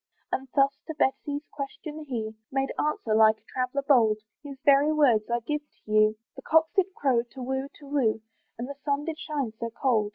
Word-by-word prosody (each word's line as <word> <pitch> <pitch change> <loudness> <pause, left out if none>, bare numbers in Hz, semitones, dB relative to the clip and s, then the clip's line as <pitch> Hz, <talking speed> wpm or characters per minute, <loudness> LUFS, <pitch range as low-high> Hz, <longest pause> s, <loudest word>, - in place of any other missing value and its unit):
And 265 - -2
thus 275 0 +3
to 315 - -5
Betty's 285 +1 0
question, 300 +2 -6
he 220 -5 -4 0.2
Made 270 0 0
answer, 300 -7 0
like 220 0 +6
a - - -34
traveller 255 +2 -2
bold, 225 -6 +5 0.2
(His 280 -2 -9
very 285 +2 +6
words 250 -9 +3
I 235 0 0
give 295 +5 -2
to 295 -7 -16
you,) 215 0 +5 0.2
"The 265 - -9
cocks 320 +3 +3
did 385 -1 +2
crow 255 -4 +2
to 245 +2 -11
whoo, 265 +2 -2
to 290 - -14
whoo, 250 -6 +1 0.4
"And 240 +2 -4
the 280 - -5
sun 285 0 0
did 325 -1 -4
shine 285 -9 -2
so 230 - -2
cold." 230 -3 +1
270 Hz, 200 wpm, -27 LUFS, 230-295 Hz, 0.4 s, like